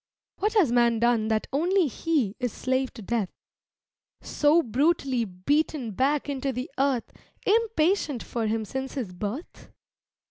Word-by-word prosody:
What 420 Hz, +3 st, 0 dB
has 350 Hz, -, +4 dB
man 235 Hz, -1 st, +3 dB
done 230 Hz, -1 st, +2 dB
that 220 Hz, -1 st, 0 dB
only 355 Hz, +6 st, +3 dB
he 275 Hz, -, 0 dB
Is 250 Hz, -2 st, -1 dB
slave 260 Hz, +2 st, -1 dB
to 225 Hz, -, -9 dB
death 215 Hz, -2 st, -1 dB, 0.9 s
so 310 Hz, +3 st, +3 dB
brutally 265 Hz, -1 st, +1 dB
Beaten 245 Hz, -, -1 dB
back 275 Hz, +8 st, +1 dB
into 275 Hz, -1 st, -2 dB
the 250 Hz, +1 st, -5 dB
earth 270 Hz, -3 st, 0 dB, 0.3 s
Impatient 390 Hz, -, +2 dB
for 230 Hz, -2 st, -2 dB
him 220 Hz, 0 st, -1 dB
since 265 Hz, +4 st, -4 dB
his 230 Hz, -10 st, -4 dB
birth? 210 Hz, -, -6 dB
260 Hz, 140 wpm, -26 LUFS, 230-305 Hz, 0.9 s, has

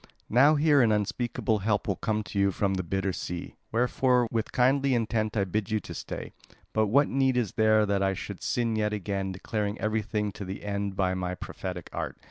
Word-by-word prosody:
Now 140 Hz, +7 st, +6 dB
here 145 Hz, -1 st, +4 dB
an 115 Hz, -3 st, +4 dB
unspeakable 110 Hz, +1 st, 0 dB
help 105 Hz, 0 st, 0 dB
will 100 Hz, -, +1 dB
come 110 Hz, +2 st, -1 dB
to 100 Hz, -, -4 dB
you 100 Hz, 0 st, +3 dB
from 95 Hz, +1 st, 0 dB
the 95 Hz, -, 0 dB
bitter 95 Hz, +2 st, -1 dB
sea; 90 Hz, 0 st, -5 dB, 0.2 s
wherefore 125 Hz, +1 st, +2 dB
with 115 Hz, -2 st, -1 dB
kindly 135 Hz, +1 st, +3 dB
intent 110 Hz, -1 st, 0 dB
I 100 Hz, -, +3 dB
bid 100 Hz, +1 st, -2 dB
you 110 Hz, 0 st, +1 dB
stay. -, -, -6 dB, 0.4 s
But 110 Hz, -1 st, +2 dB
what 140 Hz, +7 st, +4 dB
need 130 Hz, -1 st, +2 dB
is 120 Hz, -5 st, 0 dB
there 110 Hz, -1 st, +4 dB
that 100 Hz, -1 st, 0 dB
I 95 Hz, 0 st, +1 dB
should -, -, -7 dB
sin 115 Hz, -2 st, 0 dB
yet 105 Hz, -1 st, 0 dB
again 100 Hz, -1 st, -2 dB
declaring 105 Hz, +2 st, -3 dB
everything 105 Hz, -1 st, -1 dB
to 100 Hz, -, -8 dB
the 95 Hz, +1 st, -6 dB
end 100 Hz, -1 st, -2 dB
by 95 Hz, -1 st, +1 dB
my 90 Hz, -1 st, -2 dB
prophetic 90 Hz, -1 st, -6 dB
art? -, -, -4 dB
105 Hz, 200 wpm, -28 LUFS, 95-115 Hz, 0.4 s, Now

